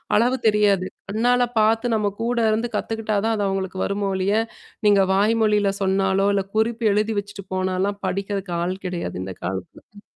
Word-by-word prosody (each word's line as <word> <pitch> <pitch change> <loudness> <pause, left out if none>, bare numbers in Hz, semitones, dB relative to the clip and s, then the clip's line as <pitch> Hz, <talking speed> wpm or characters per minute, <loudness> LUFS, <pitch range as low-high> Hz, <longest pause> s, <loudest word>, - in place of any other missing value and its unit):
அளவு 245 +4 +3
தெரியாது. 205 -3 +3 0.2
கண்ணால 245 +4 +2 0.2
பார்த்து 225 +2 +2
நம்ம 205 -2 0
கூட 240 +1 0
இருந்து 225 +2 0
கத்துக்கிட்டா 220 0 -1
தான் 225 0 +1
அது 205 - 0
அவங்களுக்கு 190 -1 -3
வருமோல்லிய. 200 +1 0 0.5
நீங்க 200 -1 +5
வாய்மொழியில 210 0 +3
சொன்னாலோ, 195 0 +2
இல்ல 195 - +1
குறிப்பு 230 +1 +1
எழுதி 215 +1 0
வச்சுட்டு 200 -1 -8
போனாலாம் 185 +2 -1
படிக்கிறதுக்கு 195 -1 -3
ஆள் 185 +2 -4
கிடையாது 175 - -4
இந்த 95 -1 -6
காலத்துல. 95 0 -5
ம். 205 - -13
205 Hz, 155 wpm, -22 LUFS, 190-220 Hz, 0.5 s, நீங்க